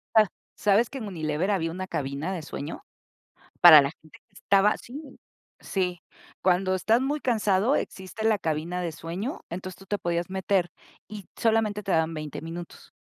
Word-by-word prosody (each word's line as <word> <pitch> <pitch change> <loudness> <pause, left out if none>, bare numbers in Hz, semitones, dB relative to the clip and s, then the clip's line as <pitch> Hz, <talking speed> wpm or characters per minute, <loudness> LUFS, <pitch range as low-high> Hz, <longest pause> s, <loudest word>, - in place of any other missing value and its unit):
A 215 -1 +7 0.3
¿Sabes 210 +3 +3
que 275 - -7
en 225 -5 -5
Unilever, 160 0 -1
había 165 -5 0
una 185 +2 -5
cabina 150 +2 -3
de 180 - -4
sueño? 150 -1 -7 0.8
Para 160 -4 +11
la 140 - -1
gente 155 - -18
que - - -41
estaba, 200 +1 +3
sí, 265 +5 -9 0.6
sí. 180 -3 -2 0.4
Cuando 185 +1 +2
estás 220 +6 +2
muy 285 +3 -1
cansado, 220 -1 +2
existe 190 +4 -5
la 220 -2 +3
cabina 165 +2 -2
de 175 -2 -2
sueño, 175 - -5
entonces, 185 +1 -6
tú 195 - -15
te 205 - -1
podías 170 0 -2
meter, 190 -2 0 0.4
y 205 -2 -9
solamente 220 -2 +1
te 195 - -2
daban 160 0 +2
20 155 -2 -6
minutos. 165 +2 -9
185 Hz, 170 wpm, -26 LUFS, 165-210 Hz, 0.8 s, Para